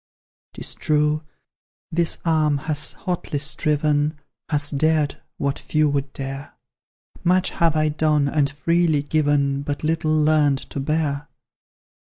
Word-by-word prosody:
"'Tis - - -5
true, 150 0 +1 0.7
this 170 0 +2
arm 155 -3 +2
has 150 +1 -2
hotly 180 -4 -3
striven, 150 +1 0 0.3
Has 145 -1 +2
dared 155 0 +1 0.2
what 140 -1 -1
few 155 -1 +1
would 140 -1 -2
dare; 135 +1 -7 0.7
Much 185 +1 +2
have 165 -2 +1
I 155 0 +2
done, 150 -1 +2
and 140 -1 +1
freely 160 +1 +1
given, 145 -2 +1
But 145 +1 -4
little 160 0 0
learnt 150 -3 +3
to - - -4
bear! 145 0 -1
150 Hz, 125 wpm, -22 LUFS, 145-155 Hz, 0.7 s, learnt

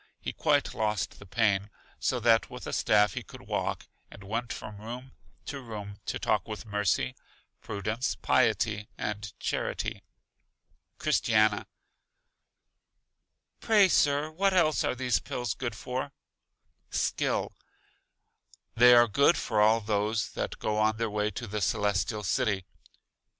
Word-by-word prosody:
He - - -5
quite - - +1
lost 105 -1 -2
the 100 - -13
pain, 105 -1 +1 0.3
so 125 - 0
that 115 -1 +4
with - - -8
a - - -5
staff 105 -1 +3
he - - -4
could - - -13
walk, - - -3 0.2
and 100 - -13
went 115 +4 -3
from 105 -1 -7
room 125 +4 -7 0.3
to 140 -2 -5
room 105 -4 -8
to - - -1
talk 105 -2 0
with 110 +1 -6
Mercy, 100 - 0 0.5
Prudence, 105 +5 -2
Piety 110 -3 +1
and 105 -1 -4
Charity. - - -2 1.0
Christiana: 110 -1 +2 1.9
Pray, 210 -3 +5
Sir, 145 -3 +2
what 195 +4 +1
else 155 -4 +3
are - - 0
these 125 -7 +1
Pills 120 +5 -3
good 120 -3 -4
for? 130 +4 -4 0.8
Skill: - - 0 1.2
They 125 +1 +7
are 120 0 +7
good 140 - +4
for 110 -3 0
all 110 +2 +5
those 105 +1 0
that - - -4
go 105 0 -1
on 110 0 +2
their 115 -1 -1
way 105 0 0
to 120 - -6
The 105 -1 -4
Celestial 100 +1 0
City. 105 -3 0
110 Hz, 135 wpm, -29 LUFS, 105-125 Hz, 1.9 s, They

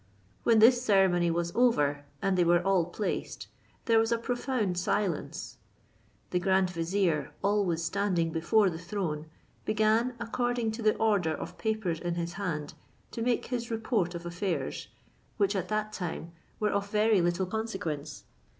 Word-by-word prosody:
When 230 - +4
this 240 +3 +6
ceremony 190 -6 +3
was 170 +1 -1
over, 145 - +2 0.2
and 195 -1 +2
they 180 - +4
were 175 +1 +3
all 190 -3 +3
placed, 195 +4 -4 0.4
there 230 -2 +4
was 225 +1 +1
a 235 - +3
profound 240 -6 -1
silence. 180 -2 -2 0.7
The 180 - +1
grand 190 0 +2
vizier 170 -1 0
always 195 -5 +1
standing 175 -2 0
before 190 +5 +3
the 165 - -6
throne, 170 -5 -3 0.4
began 220 +3 +2
according 240 0 -1
to 225 +2 -6
the 215 -1 +3
order 200 -8 +1
of - - -8
papers 215 -7 -1
in 175 0 -2
his 170 0 -3
hand 165 -6 -3 0.4
to 230 - -5
make 240 0 +1
his 240 -2 -3
report 220 -6 -1
of 170 0 -6
affairs, 175 +1 -3 0.5
which 200 -1 +2
at 190 - -1
that 215 0 -1
time 170 -3 -5 0.3
were 210 -1 +1
of 200 0 -1
very 210 -1 +3
little 175 +2 +1
consequence. 185 -8 -4
195 Hz, 155 wpm, -29 LUFS, 170-220 Hz, 0.7 s, this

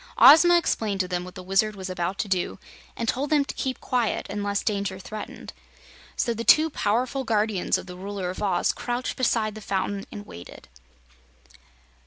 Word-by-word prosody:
Ozma 345 - +8
explained 215 - -1
to 185 - -2
them 180 -1 -2
what 180 0 -10
the 185 - -8
Wizard 200 +3 +1
was 190 -1 -6
about 185 +1 -3
to - - -2
do, 185 -2 -1 0.4
and 230 - -3
told 275 +5 -1
them 295 -2 +3
to - - -5
keep 260 -1 -3
quiet 245 -4 -1
unless 205 0 -2
danger 200 -2 -1
threatened. 210 +2 -8 0.6
So 235 - 0
the 230 +1 -4
two 310 +6 +5
powerful 250 +4 0
guardians 215 -4 +1
of - - -8
the 180 -1 -9
Ruler 190 -1 -4
of 185 - -8
Oz 190 -4 +1
crouched 245 +1 -3
beside 225 -4 +1
the 215 - -9
fountain 195 0 -2
and 205 - -8
waited. 85 - -12
210 Hz, 180 wpm, -25 LUFS, 190-240 Hz, 0.6 s, Ozma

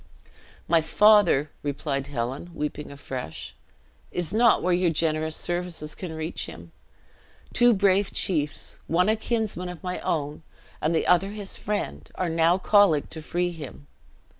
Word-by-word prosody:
"My 165 -1 +4
father," 175 -4 +4
replied 140 -1 -2
Helen, 135 +4 -4
weeping 150 -1 -4
afresh, 130 - -7 0.6
"is 175 0 -1
not 230 0 +4
where 180 - +2
your 175 0 +3
generous 160 0 0
services 175 -3 -3
can 180 -4 -6
reach 160 +2 -4
him. 85 0 -11 0.8
Two 240 0 +5
brave 195 0 +3
chiefs, 150 -5 -1
one 180 +5 +2
a 220 - +4
kinsman 220 -5 -2
of 180 0 -9
my 180 0 -3
own, 150 -1 -2 0.4
and 160 +2 +1
the - - +1
other 180 +2 +3
his 205 -2 -3
friend, 85 - -4
are 180 -2 -1
now 165 +2 +3
colleagued 190 -6 +3
to 160 - -4
free 175 +3 -1
him. 150 -3 -9
165 Hz, 145 wpm, -25 LUFS, 150-185 Hz, 0.8 s, Two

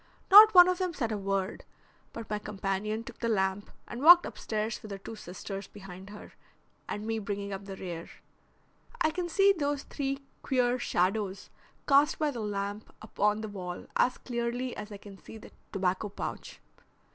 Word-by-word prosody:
Not 425 +1 +10
one 355 0 +10
of 365 0 0
them 365 -3 -2
said 230 -5 -2
a 215 - -1
word, 195 0 -2 0.5
but 230 -2 -8
my 210 -1 -2
companion 210 +2 -3
took - - -11
the 230 - -1
lamp 190 -1 0 0.2
and 235 - -7
walked 345 +3 +9
upstairs 215 0 -4
with 215 - -10
her 200 - -5
two 225 +3 -9
sisters 195 0 -7
behind 190 -1 -11
her, 210 0 -11 0.6
and 210 +1 -4
me 225 0 -1
bringing 200 -1 -4
up 195 +1 -7
the 195 -1 -7
rear. 175 -3 -7 0.9
I 315 - +2
can 350 +1 -3
see 395 +3 +5
those 290 -4 -2
three 275 -1 -4 0.2
queer 250 -2 +1
shadows 195 -1 -1 0.4
cast 285 +1 +4
by 305 -2 0
the 245 - -6
lamp 205 0 -4
upon 210 0 0
the 220 - -4
wall 180 -4 -7
as 250 - +2
clearly 240 +1 -3
as 210 +1 -8
I 205 - -7
can 200 -1 -13
see - - -10
that 215 - -14 0.2
tobacco 190 +1 -1
pouch. 200 - -7
215 Hz, 180 wpm, -29 LUFS, 195-255 Hz, 0.9 s, Not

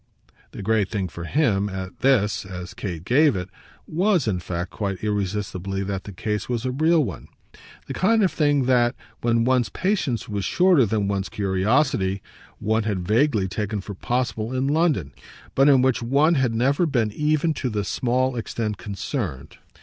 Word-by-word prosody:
The - - -8
great 105 -1 +1
thing 100 -4 -2
for 85 +1 -7
him, 105 - +1
at 95 -1 -6
this, 120 -6 +2
as 90 0 -8
Kate 85 -4 -6
gave 145 +3 +4
it, 90 -1 -4 0.4
WAS 180 - +1
in 95 -4 0
fact 85 +1 -4
quite 100 -3 -4
irresistibly 100 -2 -2
that 95 -1 -4
the 100 - -7
case 105 +3 -3
was 120 -1 -2
a 130 - 0
real 160 +4 +3
one 100 - -6 0.6
the - - -5
kind 220 +3 +3
of 185 - +3
thing 145 -3 +2
that, 120 -2 +3 0.3
when 115 -1 +2
one's 125 -1 +2
patience 185 - -1
was 100 -2 -3
shorter 175 - +4
than 105 -1 0
one's 100 -1 -2
curiosity, 100 +1 +1 0.3
one 110 +1 0
had 100 -5 -2
vaguely 110 -3 +2
taken 105 +2 -3
for 100 +1 -7
possible 120 +2 -2
in 130 +1 0
London, 145 - +1 0.4
but 135 +2 +5
in 135 -3 +5
which 130 -2 +2
one 140 +7 +3
had 130 -6 +1
never 140 +8 +2
been 120 -7 +1
even 155 +5 +1
to 130 - -3
this 105 -3 -2
small 130 0 0
extent 110 -2 -3
concerned. 90 -9 -5
110 Hz, 175 wpm, -23 LUFS, 100-135 Hz, 0.6 s, but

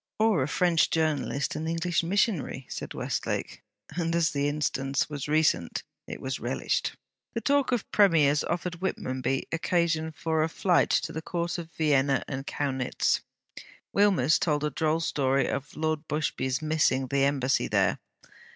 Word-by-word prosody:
'Or 215 -8 +3
a 130 - 0
French 170 +1 +2
journalist 150 -3 0
an 155 +1 -3
English 165 +1 0
missionary,' 170 - 0
said - - -6
Westlake; - - -3 0.3
and 165 -1 0
as 170 -2 +2
the 140 0 0
instance 140 -1 -1
was 145 -1 -4
recent 150 - +1 0.2
it - - -6
was - - -4
relished. 65 - -1 0.4
The 230 - -1
talk 285 0 +2
of 245 -4 -1
Premiers 155 -8 +4
offered 175 0 -3
Whitmonby 130 -7 -1
occasion 165 -1 0
for 160 0 -1
a 160 - +1
flight 175 +1 +2
to - - +1
the 160 - -4
Court 170 +1 -3
of 165 -1 -8
Vienna 140 -3 +2
and 135 0 -5
Kaunitz. 130 -3 0 0.7
Wilmers 190 -8 +4
told 150 -3 0
a 150 - 0
droll 160 +3 0
story 135 -4 +1
of 140 +1 -4
Lord 155 0 -2
Busby's 145 -2 -1
missing 155 -4 +2
the 135 +2 +1
Embassy 135 -2 +1
there. - - +2
155 Hz, 150 wpm, -27 LUFS, 140-170 Hz, 0.7 s, Premiers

